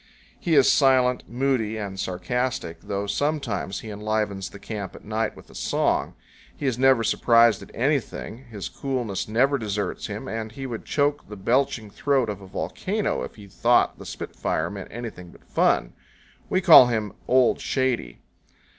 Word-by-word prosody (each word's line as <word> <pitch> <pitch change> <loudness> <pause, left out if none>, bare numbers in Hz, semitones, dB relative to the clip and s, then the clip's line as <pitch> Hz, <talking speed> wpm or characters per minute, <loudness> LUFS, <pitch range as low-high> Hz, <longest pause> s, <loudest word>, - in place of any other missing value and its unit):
He 170 -4 +1
is 140 -3 +6
silent, 130 -2 +4
moody, 120 -3 0
and 100 -3 -5
sarcastic, 95 +1 -2
though 100 0 -3
sometimes 115 -4 -2
he 110 - -7
enlivens 105 -2 -2
the - - -11
camp 100 -2 -6
at - - -13
night 110 +1 -1
with - - -14
a - - -15
song. - - 0 0.4
He - - -5
is 125 -3 0
never 130 -3 +5
surprised 115 -2 +4
at - - -11
anything, 135 -2 -2
his 110 -5 -6
coolness 125 -8 -3
never 135 +6 +2
deserts 105 -4 -3
him, - - -6
and 110 0 -4
he 135 +1 -6
would 120 -4 -6
choke 145 -3 0
the 105 - -7
belching 115 0 0
throat 135 -1 +1
of 100 -1 -8
a 95 - -11
volcano 200 - -2
if - - -6
he 105 - -12
thought 115 +5 +2
the - - -9
spitfire 80 +2 -3
meant 100 -2 -7
anything 110 -6 -7
but - - -18
fun. - - +1 0.6
We 185 - +2
call 165 -9 +9
him 110 -4 -2
"Old 130 -1 +4
Shady." 125 - -1
115 Hz, 165 wpm, -25 LUFS, 100-130 Hz, 0.6 s, call